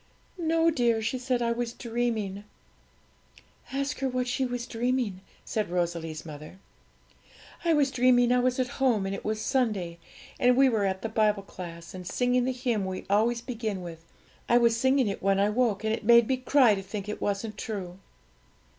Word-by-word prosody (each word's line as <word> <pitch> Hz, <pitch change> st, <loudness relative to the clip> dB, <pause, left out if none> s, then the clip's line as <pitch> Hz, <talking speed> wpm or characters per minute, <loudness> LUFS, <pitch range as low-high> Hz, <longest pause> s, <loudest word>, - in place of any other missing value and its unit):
'No, 330 Hz, -1 st, +2 dB
dear,' 240 Hz, -6 st, +2 dB
she 250 Hz, +4 st, -1 dB
said; 250 Hz, -1 st, 0 dB
'I 235 Hz, -, +1 dB
was 235 Hz, 0 st, -2 dB
dreaming.' 225 Hz, -5 st, -2 dB, 1.3 s
'Ask 275 Hz, +1 st, -2 dB
her 265 Hz, 0 st, 0 dB
what 255 Hz, 0 st, -1 dB
she 255 Hz, +1 st, 0 dB
was 245 Hz, -1 st, -4 dB
dreaming,' 240 Hz, -5 st, -1 dB, 0.2 s
said 215 Hz, -4 st, -2 dB
Rosalie's 170 Hz, -3 st, -2 dB
mother. 155 Hz, +3 st, -10 dB, 1.1 s
'I 335 Hz, -1 st, +3 dB
was 280 Hz, -2 st, +2 dB
dreaming 245 Hz, -1 st, +4 dB
I 250 Hz, -, +4 dB
was 255 Hz, +1 st, +1 dB
at 255 Hz, +1 st, -3 dB
home, 230 Hz, -7 st, +3 dB
and 195 Hz, -, -2 dB
it -, -, -6 dB
was 215 Hz, 0 st, -2 dB
Sunday, 215 Hz, -9 st, -1 dB, 0.4 s
and 250 Hz, 0 st, +4 dB
we 270 Hz, 0 st, +6 dB
were 215 Hz, -4 st, +1 dB
at 190 Hz, 0 st, -2 dB
the 225 Hz, -, -2 dB
Bible 215 Hz, -2 st, +1 dB
class, 170 Hz, -3 st, -9 dB
and 180 Hz, -1 st, -8 dB
singing 245 Hz, +4 st, +1 dB
the 260 Hz, -, +1 dB
hymn 245 Hz, -5 st, -1 dB
we 185 Hz, 0 st, -5 dB
always 230 Hz, +3 st, +2 dB
begin 220 Hz, -6 st, -4 dB
with, 165 Hz, -1 st, -9 dB, 0.5 s
I 240 Hz, -, +6 dB
was 235 Hz, -1 st, +4 dB
singing 260 Hz, +1 st, +2 dB
it 200 Hz, -, -3 dB
when 195 Hz, 0 st, +2 dB
I 205 Hz, +1 st, +3 dB
woke, 225 Hz, -3 st, +1 dB
and 220 Hz, 0 st, +1 dB
it 230 Hz, -, -3 dB
made 235 Hz, +1 st, +6 dB
me 260 Hz, -, +1 dB
cry 255 Hz, -2 st, +4 dB
to 195 Hz, -, -2 dB
think 200 Hz, +1 st, -6 dB
it 210 Hz, -, -5 dB
wasn't 205 Hz, +1 st, -2 dB
true.' 190 Hz, -5 st, -6 dB
230 Hz, 190 wpm, -27 LUFS, 195-250 Hz, 1.3 s, we